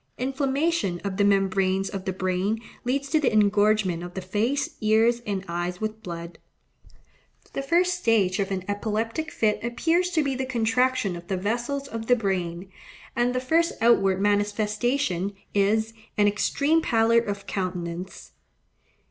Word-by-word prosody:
Inflammation 270 - 0
of 195 -2 -3
the 205 - +3
membranes 195 -1 +2
of 195 -1 -6
the 190 - 0
brain 185 +3 -1 0.3
leads 275 +3 -1
to 310 - +4
the 285 - +2
engorgement 205 -3 +3
of 175 0 -8
the 190 - -3
face, 220 +9 -1
ears, 225 +2 +3
and 195 -2 -2
eyes 175 +1 -3
with 215 0 -4
blood. 170 -2 -7 1.1
The - - -2
first 355 +5 +2
stage 210 - +2
of 195 0 0
an 190 -2 -2
epileptic 220 +8 -2
fit 215 -9 0
appears 325 +10 +1
to 315 -2 +3
be 275 -1 -1
the 260 0 -3
contraction 235 -4 +1
of 175 0 -10
the 190 - -1
vessels 240 +8 -2
of 225 -3 -6
the 245 - +5
brain, 185 -4 -2 0.4
and 245 +1 +1
the - - +2
first 325 +6 +2
outward 195 -5 +4
manifestation 205 +1 0 0.2
is, 220 +3 +2 0.2
an 205 -1 +4
extreme 285 +10 +2
pallor 230 -3 +3
of 200 -3 -4
countenance. 180 -1 -5
215 Hz, 150 wpm, -25 LUFS, 190-250 Hz, 1.1 s, the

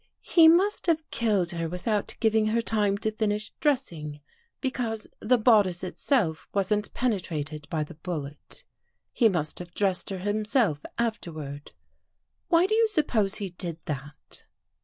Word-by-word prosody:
" - - -55 0.2
He 330 -2 +9
must 365 +5 +4
have 320 -2 +1
killed 205 -6 +1
her 165 -1 -3
without 200 +4 -2
giving 220 -1 +3
her 230 +2 +1
time 210 -3 +1
to 220 +1 -1
finish 215 -1 -1
dressing, 170 - -1 0.4
because 235 -5 -2
the 250 +3 +3
bodice 210 -7 +4
itself 185 - 0
wasn't 205 +1 +1
penetrated 155 - -2
by 155 -2 -1
the 150 - -10
bullet. 150 - -7 0.5
He 230 -3 +4
must 160 -6 -2
have 175 0 -10
dressed 195 -3 0
her 195 - -3
himself 205 - +1 0.2
afterward. 155 -11 -4 0.7
Why 340 0 +4
do 410 - 0
you 450 +1 +4
sup 340 -9 +1
pose 210 -3 +1
he 200 -4 -2
did 175 -2 -5
that? 145 0 -7
205 Hz, 150 wpm, -27 LUFS, 170-235 Hz, 0.7 s, He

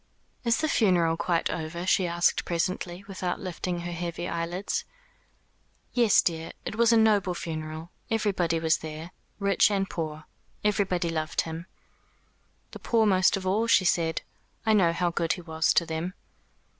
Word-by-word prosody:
"Is 235 +1 +2
the 315 - +1
funeral 180 - +3
quite 170 0 0
over?" 170 +2 -4
she 185 -1 +3
asked 175 +1 +2
presently, 175 +1 -2
without 185 -2 -3
lifting 180 -1 -4
her 175 0 -5
heavy 175 0 -4
eyelids. 170 +3 -2 1.1
"Yes, 235 -4 +5
dear. 165 -1 -2
It - - -4
was 235 +1 +4
a 230 - +5
noble 205 -5 +3
funeral. 160 0 -6 0.2
Everybody 190 -7 +1
was 160 0 +2
there 160 +2 -7 0.3
rich 200 0 +3
and 195 -2 0
poor. 155 -3 -5 0.4
Everybody 190 -4 +1
loved 155 0 -1
him." 165 +2 -6 1.0
"The - - -9
poor 225 -2 +2
most 190 -2 +4
of 190 - -7
all," 210 +5 +1
she 215 -5 +4
said. 165 -2 +1 0.4
"I 220 - +4
know 185 -5 +4
how 175 +1 0
good 170 -1 0
he 185 - -7
was 160 -1 +1
to 170 - +4
them." 165 +3 -4
175 Hz, 155 wpm, -27 LUFS, 165-195 Hz, 1.1 s, Yes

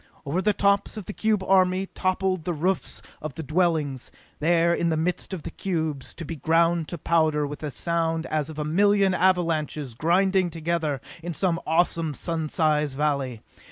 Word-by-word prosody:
Over 155 +7 0
the 210 - +3
tops 200 +1 +1
of 210 - -6
the 210 - -6
cube 215 -3 +1
army 185 0 +3
toppled 185 -2 -1
the 175 - -2
roofs 180 +4 -1 0.2
of 155 -3 -6
the 160 - -5
dwellings, 155 -4 0 0.3
there, 170 +2 +3
in 170 0 +1
the 160 - +1
midst 175 +5 -1
of 180 -5 -5
the 170 - -6
cubes, 160 -8 -3
to 165 - -7
be 165 +2 -6
ground 165 +1 +2
to 175 - -5
powder, 155 -2 +2
with 145 +1 -7
a 150 - -3
sound 165 +3 -1
as 155 -1 -1
of 155 - -8
a 150 - -2
million 200 +4 +3
avalanches 165 -7 +1
grinding 185 +7 +2
together 160 -4 -2 0.2
in 170 0 -5
some 175 -1 0
awesome, 165 -2 +1
sun 160 -1 -3
size 150 -3 +1
valley. 140 -5 -1
165 Hz, 180 wpm, -25 LUFS, 155-185 Hz, 0.3 s, the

